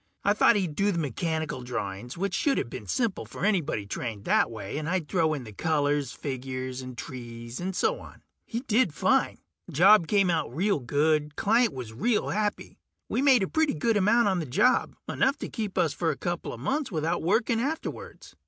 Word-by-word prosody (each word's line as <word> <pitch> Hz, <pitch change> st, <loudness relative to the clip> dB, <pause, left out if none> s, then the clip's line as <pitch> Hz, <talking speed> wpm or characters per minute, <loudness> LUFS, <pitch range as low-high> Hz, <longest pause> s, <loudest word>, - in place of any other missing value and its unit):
I 200 Hz, -, +4 dB
thought 215 Hz, -, +5 dB
he'd 185 Hz, -7 st, 0 dB
do 200 Hz, +4 st, +2 dB
the 175 Hz, -, -2 dB
mechanical 160 Hz, -1 st, -2 dB
drawings, 120 Hz, -, -5 dB
which 195 Hz, +1 st, -2 dB
shoulda 275 Hz, +8 st, +1 dB
been 115 Hz, -3 st, -8 dB
simple 230 Hz, -, -1 dB
for -, -, -5 dB
anybody 165 Hz, -, 0 dB
trained 105 Hz, 0 st, -5 dB
that -, -, +3 dB
way, 110 Hz, +4 st, -5 dB
and 155 Hz, +1 st, -4 dB
I'd 180 Hz, -4 st, -1 dB
throw 160 Hz, -3 st, +1 dB
in 135 Hz, -, -6 dB
the 110 Hz, -3 st, -10 dB
colors, 145 Hz, +1 st, 0 dB
figures 130 Hz, -1 st, -5 dB
and 130 Hz, -1 st, -9 dB
trees 120 Hz, -2 st, -7 dB
and 185 Hz, +1 st, -3 dB
so -, -, +1 dB
on. -, -, -14 dB, 0.2 s
He 230 Hz, +1 st, -4 dB
did 220 Hz, -, +1 dB
fine. -, -, +2 dB, 0.3 s
Job 185 Hz, +3 st, +6 dB
came 195 Hz, -2 st, +3 dB
out 160 Hz, -2 st, -2 dB, 0.3 s
good; 150 Hz, +1 st, +1 dB
client 225 Hz, +2 st, +3 dB
was 125 Hz, -4 st, -7 dB
real 220 Hz, -, 0 dB
happy. 210 Hz, 0 st, -2 dB, 0.3 s
We -, -, 0 dB
made 265 Hz, -6 st, +5 dB
a -, -, 0 dB
pretty 315 Hz, -, +1 dB
good 225 Hz, +9 st, +1 dB
amount 210 Hz, +3 st, +4 dB
on 190 Hz, -2 st, +1 dB
the 160 Hz, -, -4 dB
job, 200 Hz, -, +2 dB
enough 280 Hz, -, +1 dB
to -, -, -6 dB
keep 215 Hz, -4 st, -4 dB
us -, -, +2 dB
for -, -, -1 dB
a -, -, -2 dB
coupla -, -, -4 dB
months 285 Hz, -2 st, -2 dB
without 160 Hz, -1 st, -1 dB
working 225 Hz, +6 st, +1 dB
afterwards. 310 Hz, +5 st, -5 dB
160 Hz, 190 wpm, -27 LUFS, 130-210 Hz, 0.3 s, Job